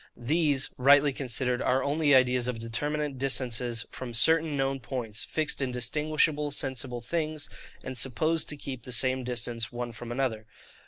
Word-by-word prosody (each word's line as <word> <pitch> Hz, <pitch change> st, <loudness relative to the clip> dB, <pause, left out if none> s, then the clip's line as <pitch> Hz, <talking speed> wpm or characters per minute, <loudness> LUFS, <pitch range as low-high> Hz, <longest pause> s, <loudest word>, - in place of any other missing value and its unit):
These, 145 Hz, +2 st, +1 dB
rightly 140 Hz, +2 st, +5 dB
considered, 125 Hz, -1 st, -1 dB
are 130 Hz, +1 st, +1 dB
only 145 Hz, 0 st, +3 dB
ideas 125 Hz, -1 st, +3 dB
of 125 Hz, -2 st, -2 dB
determinate 145 Hz, +5 st, -3 dB
distances 125 Hz, -3 st, 0 dB
from 120 Hz, -2 st, -7 dB
certain 160 Hz, +4 st, +4 dB
known 135 Hz, 0 st, 0 dB
points, 115 Hz, -3 st, -4 dB
fixed 155 Hz, -2 st, -1 dB
in 130 Hz, -2 st, -1 dB
distinguishable 150 Hz, +4 st, 0 dB
sensible 130 Hz, -3 st, -2 dB
things, 155 Hz, +3 st, -3 dB, 0.3 s
and 130 Hz, -, -6 dB
supposed 135 Hz, +7 st, +1 dB
to 150 Hz, -, -2 dB
keep 135 Hz, -3 st, -6 dB
the 125 Hz, +2 st, -6 dB
same 130 Hz, +2 st, +3 dB
distance 120 Hz, -2 st, -1 dB
one 120 Hz, 0 st, -5 dB
from 115 Hz, +1 st, -9 dB
another. 120 Hz, -4 st, -2 dB
130 Hz, 155 wpm, -28 LUFS, 120-145 Hz, 0.3 s, rightly